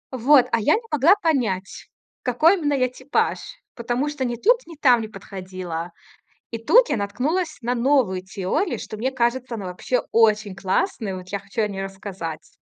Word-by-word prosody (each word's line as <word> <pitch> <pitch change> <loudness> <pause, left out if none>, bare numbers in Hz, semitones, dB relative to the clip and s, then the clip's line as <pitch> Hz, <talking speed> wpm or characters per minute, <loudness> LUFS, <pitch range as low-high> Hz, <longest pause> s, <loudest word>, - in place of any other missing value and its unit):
Вот, 260 +2 +5
а 230 - +2
я 255 +8 +3
не 450 - -2
могла 300 +7 +5
понять, 245 - -1 0.3
какой 305 +9 +4
именно 290 -2 0
я 255 -2 +2
типаж, 260 +2 -1 0.3
потому 245 +4 -2
что 295 -3 -4
ни 240 -1 -2
тут, 475 - +3
ни 335 - -10
там 255 -5 +4
не 220 - -5
подходила. 185 -4 -7 0.6
И 230 - -3
тут 470 - +4
я - - 0
наткнулась 300 - -2
на 245 +1 -1
новую 235 -7 +2
теорию, 190 - -2
что, 215 - -7
мне 250 +5 -1
кажется, 245 -1 -1
она 200 - -6
вообще 180 +7 -1
очень 215 -3 +3
классная. 195 - -1
Вот 185 0 -10
я 200 - -3
хочу 200 +3 -5
о 210 - +1
ней 195 -1 -5
рассказать. 195 -5 -7
235 Hz, 180 wpm, -23 LUFS, 195-275 Hz, 0.6 s, Вот